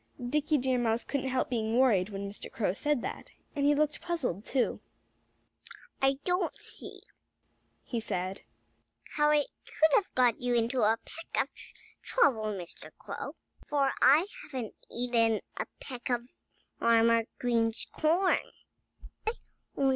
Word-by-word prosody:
Dickie 300 +3 +2
Deer 255 -1 +1
Mouse 230 -1 +1
couldn't 270 -1 -2
help 260 0 +1
being 225 -1 0
worried 215 -8 +4
when 200 -1 -4
Mr. 200 - -8
Crow 200 -5 0
said 290 +3 0
that. - - -5 0.3
And 285 -1 +2
he 290 - +5
looked 300 0 +1
puzzled, 265 - -2
too. 255 +1 0 1.2
"I 270 0 +3
don't 360 -1 0
see," - - -6 0.8
he 235 - -3
said, 190 -3 -3 0.7
"how 295 0 +4
I 300 -1 +4 0.2
could 315 -1 +2
have 400 - +3
got 250 -2 +3
you 245 -1 +1
into 235 +2 +1
a 220 +1 +4
peck 330 - -2
of - - -17 0.5
trouble, 260 - +3
Mr. 190 -5 -5
Crow, - - -6 0.3
for 280 -2 +1
I 290 +7 +7 0.2
haven't 255 - -5 0.2
eaten 230 -2 +2 0.2
a - - -2
peck 250 -2 -6
of 240 -1 0 0.5
Farmer 230 0 +4
Green's 230 -2 +1
corn. 340 +5 +3
245 Hz, 135 wpm, -30 LUFS, 225-290 Hz, 1.2 s, I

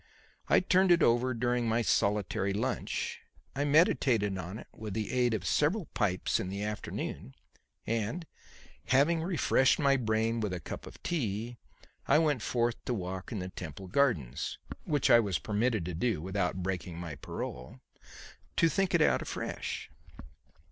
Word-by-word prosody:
I - - +5
turned 185 0 +4
it 170 -1 +5
over 120 +2 +3
during 120 0 0
my 115 +1 +2
solitary 100 -2 +1
lunch; 125 +5 -2 0.4
I 140 +1 0
meditated 130 - +3
on 95 +2 -5
it - - -10
with 105 -3 -6
the 110 -1 -2
aid 125 -3 +2
of 95 -4 -4
several 160 - +2
pipes 95 -4 +1
in 90 - -3
the 100 +2 -4
afternoon; 105 -9 -5 0.5
and 115 +10 -2 0.6
having 150 +5 +3
refreshed 160 -6 +3
my 140 -2 +3
brain 115 -1 0
with 105 -4 -2
a 90 - -3
cup - - -7
of - - -13
tea, 120 - -2 0.5
I - - +5
went 150 -6 +2
forth 120 0 0
to 125 - -1
walk 95 0 -5
in 115 - -3
the 90 -1 -4
Temple 90 0 -8
gardens 90 - 0 0.3
which 145 -3 +2
I 120 - +9
was 100 -6 0
permitted 110 -3 0
to 90 - -4
do 110 +4 0
without 95 +1 -2
breaking 90 -2 -3
my 85 -2 -5
parole 65 -2 -7 0.8
to 165 - +5
think 190 +3 +1
it 165 - +5
out - - +3
afresh. - - -5
115 Hz, 160 wpm, -31 LUFS, 95-135 Hz, 0.8 s, I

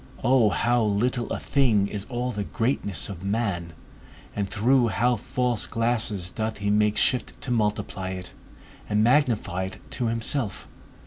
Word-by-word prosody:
O 125 -3 +4
how 120 +3 +2
little 115 +4 0
a - - -1
thing 115 -8 +2
is 100 0 -4
all 125 0 -2
the 105 -3 -3
greatness 115 - -1
of 95 -3 -8
man 100 -5 -2 0.6
and 100 -2 -2
through 120 +4 +3
how 120 +2 +2
false 120 +1 0
glasses 110 -6 0
doth 110 +3 -3
he 100 0 -1
make 105 0 +2
shift 125 - +1
to 125 - -3
multiply 105 -4 -1
it, 90 -1 -6 0.6
and 105 0 +2
magnify 115 - +2
it 95 - -7
to 120 - -1
himself! 115 0 -1
110 Hz, 150 wpm, -25 LUFS, 100-120 Hz, 0.6 s, O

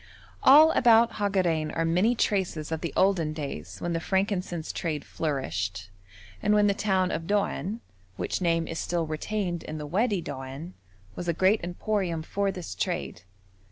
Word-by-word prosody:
All 305 +4 +8
about 235 -4 +4
Hagarein 185 -7 +1
are 165 - +1
many 185 +9 +2
traces 180 -8 -1
of 160 - -2
the 170 - -3
olden 180 -5 +2
days 150 -3 -6
when 175 0 -2
the 165 - 0
frankincense 185 -2 -1
trade 155 -4 -3
flourished, 100 - -3 0.5
and 210 - +3
when 210 0 +4
the 200 - +3
town 190 -3 +1
of 165 0 -3
Doan, 205 +1 -1 0.4
which - - -2
name 165 -2 +1
is 165 - -4
still 170 -2 -1
retained 175 +3 -3
in 155 - -6
the 150 - -5
Wadi 205 +6 +1
Doan, 140 +3 -7 0.4
was 175 - -5
a 170 - +2
great 190 +6 +3
emporium 175 -2 -2
for 200 +4 -1
this 180 - -6
trade. 95 - -3
175 Hz, 160 wpm, -27 LUFS, 160-200 Hz, 0.5 s, All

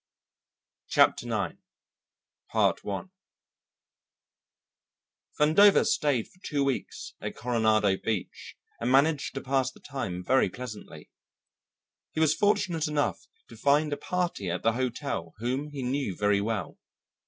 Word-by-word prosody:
Chapter - - +3
Nine - - -2 1.0
Vandover 105 - 0 2.7
stayed 140 -7 +1
for 180 - -25
two 145 -5 -1
weeks 135 -2 -3
at - - -5
Coronado 110 -4 +2
Beach 110 -3 -4 0.2
and 120 +2 0
managed 140 +2 +3
to 135 - -3
pass 135 -1 +1
the - - -18
time 95 -11 -5
very 130 -1 +3
pleasantly. 125 +1 -9 1.0
He - - -3
was 160 -1 +4
fortunate 180 -3 +1
enough 150 -1 -1 0.2
to - - -13
find 145 +1 +2
a - - -2
party 175 - -2
at 90 +2 -3
the 115 - +4
hotel 120 - -3
whom 130 +6 -2
he 140 -3 -6
knew 130 -6 -1
very 105 -1 +2
well. 105 -4 -3
130 Hz, 120 wpm, -28 LUFS, 110-145 Hz, 2.7 s, was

